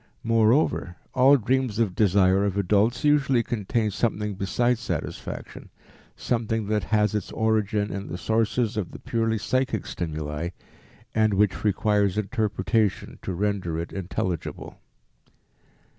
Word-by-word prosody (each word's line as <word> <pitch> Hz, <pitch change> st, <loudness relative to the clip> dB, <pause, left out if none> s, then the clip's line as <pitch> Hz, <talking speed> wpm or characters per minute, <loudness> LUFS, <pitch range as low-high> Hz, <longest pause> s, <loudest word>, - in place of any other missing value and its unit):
Moreover, 115 Hz, -, +2 dB, 0.2 s
all 135 Hz, +2 st, +6 dB
dreams 130 Hz, -1 st, 0 dB
of 110 Hz, -5 st, +1 dB
desire 95 Hz, -1 st, +3 dB
of 100 Hz, -1 st, -1 dB
adults 105 Hz, -, +2 dB
usually 140 Hz, -5 st, +3 dB
contain 110 Hz, 0 st, -1 dB
something 105 Hz, 0 st, -1 dB
besides 115 Hz, +5 st, 0 dB
satisfaction, -, -, -5 dB, 0.5 s
something 115 Hz, -2 st, -1 dB
that 105 Hz, -1 st, 0 dB
has 105 Hz, -2 st, +2 dB
its 105 Hz, -3 st, -3 dB
origin 110 Hz, -2 st, 0 dB
in 100 Hz, +1 st, -5 dB
the 90 Hz, -, -5 dB
sources 110 Hz, +2 st, 0 dB
of 100 Hz, -5 st, -3 dB
the -, -, -8 dB
purely 115 Hz, -1 st, 0 dB
psychic 130 Hz, +1 st, -1 dB
stimuli, 75 Hz, -1 st, -4 dB, 0.6 s
and 110 Hz, -2 st, +2 dB
which 105 Hz, -1 st, +1 dB
requires 105 Hz, -1 st, +2 dB
interpretation 110 Hz, 0 st, -1 dB
to -, -, -4 dB
render 95 Hz, -3 st, -1 dB
it 85 Hz, 0 st, -5 dB
intelligible. 90 Hz, -2 st, -4 dB
105 Hz, 125 wpm, -25 LUFS, 100-115 Hz, 0.6 s, all